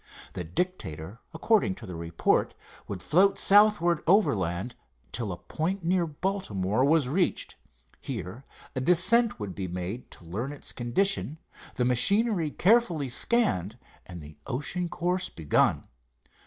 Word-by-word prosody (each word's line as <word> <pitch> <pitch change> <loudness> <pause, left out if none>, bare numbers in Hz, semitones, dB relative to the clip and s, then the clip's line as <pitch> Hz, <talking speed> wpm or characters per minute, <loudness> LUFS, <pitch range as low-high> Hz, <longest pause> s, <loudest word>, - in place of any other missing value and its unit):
The 90 - -4
Dictator, 90 - -4
according 160 - +1
to 115 - -11
the 90 - -8
report, 85 0 0 0.3
would 95 -3 -6
float 195 +4 +3
southward 200 -5 +4
overland 105 - +1 0.4
till 115 -4 -3
a 90 - -5
point 165 - -3
near 175 0 +1
Baltimore 130 - -1
was 145 -1 +3
reached. 175 +7 -1 0.4
Here 100 - -6 0.3
a 130 - -1
descent 195 - +3
would 100 -3 -5
be 95 -2 -5
made 90 +7 -5
to 85 - -14
learn 110 - -4
its 145 - -4
condition, 150 +6 0 0.4
the 125 - 0
machinery 185 - +2
carefully 180 - +2
scanned, 120 - 0 0.3
and 90 -4 -9
the 75 0 -13
ocean 170 +7 -2
course 180 +2 -1
begun. 80 -3 +1
140 Hz, 130 wpm, -27 LUFS, -, 0.4 s, southward